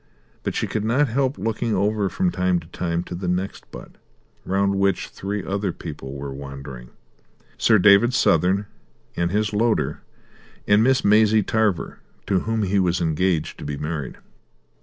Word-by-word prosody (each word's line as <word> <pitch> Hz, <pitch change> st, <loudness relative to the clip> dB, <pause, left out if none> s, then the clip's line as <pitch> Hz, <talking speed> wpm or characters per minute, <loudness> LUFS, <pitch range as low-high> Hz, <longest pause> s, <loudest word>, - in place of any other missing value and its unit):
But -, -, -3 dB
she -, -, 0 dB
could 105 Hz, -, -3 dB
not 125 Hz, +6 st, +2 dB
help 135 Hz, +3 st, 0 dB
looking 115 Hz, 0 st, -1 dB
over 100 Hz, +1 st, +1 dB
from 180 Hz, -, 0 dB
time 90 Hz, -, +1 dB
to 80 Hz, -, -15 dB
time 85 Hz, -1 st, -2 dB
to 90 Hz, -, -8 dB
the 90 Hz, +1 st, -4 dB
next 90 Hz, +2 st, -3 dB
butt, -, -, -11 dB, 0.5 s
round 100 Hz, +1 st, +1 dB
which 100 Hz, -2 st, +1 dB
three 100 Hz, +1 st, -4 dB
other 100 Hz, 0 st, -1 dB
people 75 Hz, -5 st, -8 dB
were 70 Hz, 0 st, -6 dB
wandering: 70 Hz, -3 st, -9 dB, 0.7 s
Sir 110 Hz, -, +5 dB
David 105 Hz, +5 st, +6 dB
Southern, 95 Hz, +5 st, +3 dB, 0.5 s
and 85 Hz, 0 st, 0 dB
his 105 Hz, +2 st, 0 dB
loader, 115 Hz, +2 st, 0 dB, 0.7 s
and 105 Hz, +2 st, +5 dB
Miss 130 Hz, +1 st, +2 dB
Maisie 105 Hz, +1 st, +5 dB
Tarver, 110 Hz, -3 st, 0 dB, 0.3 s
to 95 Hz, -2 st, +1 dB
whom 110 Hz, +2 st, -1 dB
he 100 Hz, +1 st, +1 dB
was 90 Hz, -2 st, +1 dB
engaged 80 Hz, 0 st, 0 dB
to -, -, -7 dB
be 70 Hz, 0 st, -4 dB
married. 75 Hz, -4 st, -4 dB
100 Hz, 160 wpm, -23 LUFS, 85-110 Hz, 0.7 s, David